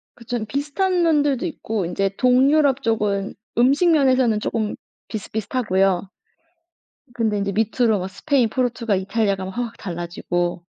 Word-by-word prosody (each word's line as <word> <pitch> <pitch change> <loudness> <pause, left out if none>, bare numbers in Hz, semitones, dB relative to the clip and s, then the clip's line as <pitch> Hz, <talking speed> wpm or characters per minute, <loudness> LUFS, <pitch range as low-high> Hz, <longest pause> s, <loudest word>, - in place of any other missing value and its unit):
그쵸. 235 -1 -4
비슷한 340 - 0
면들도 295 -3 +2
있고 220 - -3
인제 195 +3 0
동유럽 270 +2 +4
쪽은 205 -3 0 0.2
음식 280 +8 +4
면에서는 260 -7 +3
쪼금 215 0 -2 0.3
비슷비슷하고요. 200 -3 -1 1.0
근데 220 -3 0
인제 200 0 -1
밑으로 220 0 +1
막 185 +1 -4
스페인, 260 -1 +1
포르투갈, 235 -5 0
이탈리아 200 +1 0
가면 190 0 -6
확확 235 -1 -4
달라지고. 175 -1 -3
225 Hz, 330 characters per minute, -22 LUFS, 200-260 Hz, 1.0 s, 동유럽